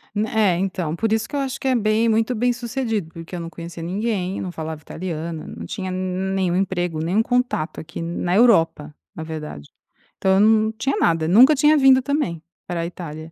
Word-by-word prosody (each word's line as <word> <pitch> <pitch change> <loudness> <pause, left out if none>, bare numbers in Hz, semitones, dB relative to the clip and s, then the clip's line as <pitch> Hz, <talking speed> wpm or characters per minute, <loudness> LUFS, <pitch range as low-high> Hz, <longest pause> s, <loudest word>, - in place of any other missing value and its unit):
N 210 +1 +1
é, 210 -6 +2
então. 180 -4 -2
Por 225 +3 -1
isso 225 0 0
que 290 - -7
eu - - 0
acho 270 -1 -3
que - - -3
é 255 - +3
bem 220 0 +2
muito 225 +2 +1
bem-sucedido 235 -5 -1
porque 165 +2 -8
eu - - -4
não 165 0 -6
conhecia 170 0 -9
ninguém, 195 +1 -2
não 185 - -4
falava 160 -2 -6
italiana, 165 -1 -5
não 85 +1 -8
tinha 185 - -5
nenhum 185 0 -1
emprego, 175 -4 -1
nenhum 185 +8 +1
contato 245 -11 -1
aqui, 160 - -7
na 175 +2 -2
Europa, 165 -10 +3 0.2
na 160 - -6
verdade. 150 - -7 0.5
Então, 190 0 +2
eu - - +4
não 220 +1 +4
tinha 270 +5 -1
nada, 165 -2 +2
nunca 250 - +7
tinha 300 +2 +4
vindo, 265 -2 +6
também, 260 - -2 0.3
pra 170 -1 -2
Itália. 160 -2 -8
185 Hz, 195 wpm, -22 LUFS, 165-225 Hz, 0.5 s, nunca